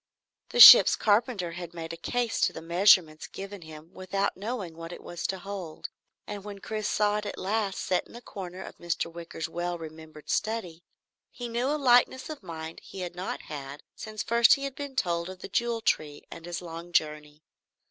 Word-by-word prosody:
The 485 - -2
ship's - - +12
carpenter 210 -4 +1
had 175 0 -8
made 165 -1 -6
a - - -5
case 240 +7 -2
to - - +1
measurements 170 -2 +3
given 195 0 -8
him 160 +2 -12
without 190 +2 -2
knowing 200 -5 -5
what 165 +1 -8
it - - -10
was 175 -1 -4
to 190 - -3
hold, 190 -4 -7 0.4
and 205 -1 -7
when 205 -1 -8
Chris 215 +1 -4
saw 210 0 +1
it 210 0 -4
at - - -6
last 200 0 -1
set 185 - -1
in - - -15
a 240 - -9
corner 190 -5 -8
of - - -11
Mr. 170 -1 -3
Wicker's 165 -1 -6
well 175 +1 -3
remembered 155 -1 -11
study, 190 -6 -2 0.5
he 245 - -7
knew 235 +2 -1
a 295 +2 0
lightness 260 +1 +3
of 305 - -8
mind 160 -1 -8
he 190 - -9
had 175 -1 -5
not 180 +2 -5
had 140 -1 -8
since 215 -1 -6
first 235 0 +5
he 275 - -7
had 275 -1 -3
been 280 -1 -7
told 170 -6 -1
of 185 0 -10
the - - -6
Jewel 235 +2 -1
Tree 150 -8 -1
and 165 +1 -9
his 175 0 -5
long 170 +1 -8
journey. 150 -1 -1
185 Hz, 200 wpm, -28 LUFS, 165-215 Hz, 0.5 s, ship's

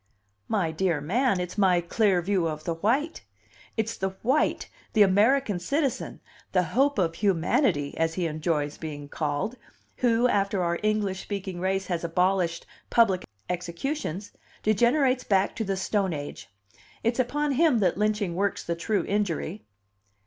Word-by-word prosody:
"My 185 -7 0
dear 165 -1 0
man, 200 - +1
it's 180 +3 -4
my 185 -3 +4
clear 180 +1 +1
view 185 -2 +1
of 155 -1 -4
the 170 - -1
white! 245 - 0 0.6
It's 225 +1 -1
the 190 - -1
white, 265 +6 +1 0.3
the 215 - +7
American 205 +2 +3
citizen, 280 - -2 0.3
the 185 -1 +4
'hope 280 +2 +3
of 170 -4 +1
humanity,' 185 - +1
as 165 0 0
he 180 - -1
enjoys 155 -2 -1
being 145 -2 -6
called, 150 - -2 0.4
who, 240 0 +3
after 200 -3 +1
our 170 0 0
English 210 -3 0
speaking 195 -3 -5
race 190 +1 0
has 175 -2 -2
abolished 175 0 +1 0.2
public 200 -6 +3 0.2
executions, 180 - -3 0.3
degenerates 250 +5 +3
back 195 -1 +1
to 225 - -1
the 195 -2 -2
Stone 190 -1 0
Age. 145 -5 -7 0.5
It's 235 +2 0
upon 290 +4 +1
him 290 -1 +4
that 180 -3 +2
lynching 210 -2 0
works 200 +2 -1
the 170 - -2
true 205 +5 -1
injury." 200 -1 -2
195 Hz, 150 wpm, -26 LUFS, 170-225 Hz, 0.6 s, the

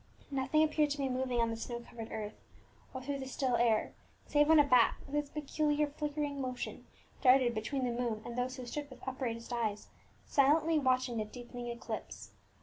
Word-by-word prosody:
Nothing 275 +3 +2
appeared 305 -1 +2
to 290 - -2
be 275 -2 0
moving 255 -1 0
on 230 0 +1
the - - -2
snow 235 +1 -5
covered 235 -1 -9
earth, 210 -1 -4 0.6
or 260 -1 -6
through 280 +1 -3
the 265 - -5
still 260 -1 0
air, 230 -2 +2 0.3
save 295 0 +3
when 320 -1 +8
a - - +8
bat, 250 -4 +5
with 275 - -12
its 295 -1 0
peculiar 300 0 0
flickering 290 -1 -3
motion, 255 -1 -5 0.3
darted 255 -2 +5
between 255 +5 -2
the 245 - 0
moon 235 -2 -2
and 240 - -6
those 250 +1 -1
who 255 -2 -7
stood 285 +4 -5
with 260 0 -13
upraised 245 -3 -3
eyes, 220 -3 -2 0.4
silently 305 +3 +4
watching 255 -3 +1
the 215 - -1
deepening 245 +2 -8
eclipse. 235 0 -6
255 Hz, 190 wpm, -33 LUFS, 240-290 Hz, 0.6 s, when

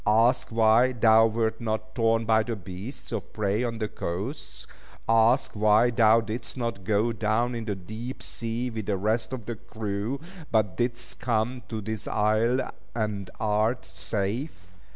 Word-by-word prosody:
Ask 115 +4 +4
why 115 +3 +4
thou 115 -1 +6
wert 115 +1 -1
not 110 -1 -3
torn 115 -1 +2
by 110 0 +4
the 115 +1 -3
beasts 95 +6 -8
of 110 -6 -4
prey 105 +2 0
on 115 -2 -2
the 110 -1 -1
coasts. 105 - -5 0.4
Ask 115 +4 +4
why 110 +3 +4
thou 115 -1 +5
didst 115 +3 -5
not 115 -6 -3
go 110 +3 +2
down 115 +2 0
in 115 -2 -4
the 105 -2 -2
deep 110 +7 -7
sea 120 +2 -3
with 110 -3 -5
the 100 -2 +1
rest 110 +6 0
of 125 -5 -5
the 120 -1 -4
crew, 110 +5 -4 0.3
but 105 -5 +2
didst 120 0 -2
come 120 +1 0
to 110 -2 -3
this 110 0 -4
isle, 110 +4 +1 0.2
and 105 -4 -2
art 110 +3 +1
safe." 95 - -4
110 Hz, 160 wpm, -27 LUFS, 105-120 Hz, 0.4 s, thou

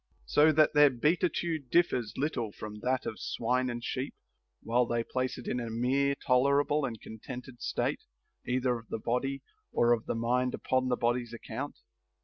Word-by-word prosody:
So 150 +2 +5
that 155 0 +4
their 145 -1 +7
beatitude 160 +1 0
differs 130 -9 +2
little 130 -6 -1
from 105 +1 -8
that 130 +3 0
of 110 - -4
swine 125 +2 0
and 120 0 -4
sheep, 130 +2 -3 0.5
while 120 +2 +2
they 120 0 0
place 130 +2 -2
it 125 - -9
in 125 - -1
a 120 -1 -4
mere 135 +5 +1
tolerable 140 +3 +3
and 115 -4 -5
contented 125 +3 -9
state, - - -1 0.4
either 125 -1 0
of 115 - -17
the - - -2
body, 135 +5 -2 0.3
or 120 0 +3
of 115 - -2
the - - -1
mind 125 +2 +1
upon 130 0 0
the 125 - +1
body's 120 0 0
account. 125 +5 -6
125 Hz, 170 wpm, -30 LUFS, 120-140 Hz, 0.5 s, their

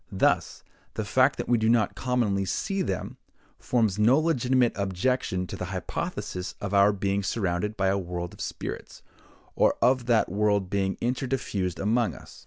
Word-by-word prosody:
Thus, 95 - +1 0.3
the 110 - -2
fact 130 +6 +3
that - - -4
we 120 -1 +3
do 110 0 +2
not 115 -3 +3
commonly 120 -6 0
see 195 - -2
them, - - -3 0.4
forms 110 -5 +1
no 115 +6 +5
legitimate 130 -6 +2
objection 95 0 -1
to - - -7
the 90 - -4
hypothesis 90 0 -4
of 100 0 -4
our 100 +1 +6
being 100 0 -1
surrounded 100 0 -2
by 95 0 +2
a 100 +1 +1
world 85 -1 -5
of - - -11
spirits, - - -6 0.5
or - - +3
of 125 0 +2
that 115 -3 +3
world 100 -1 0
being 95 -1 0
inter 125 +2 -1
diffused 100 -9 -2
among 110 +3 +1
us. - - -13
105 Hz, 170 wpm, -27 LUFS, 95-125 Hz, 0.5 s, our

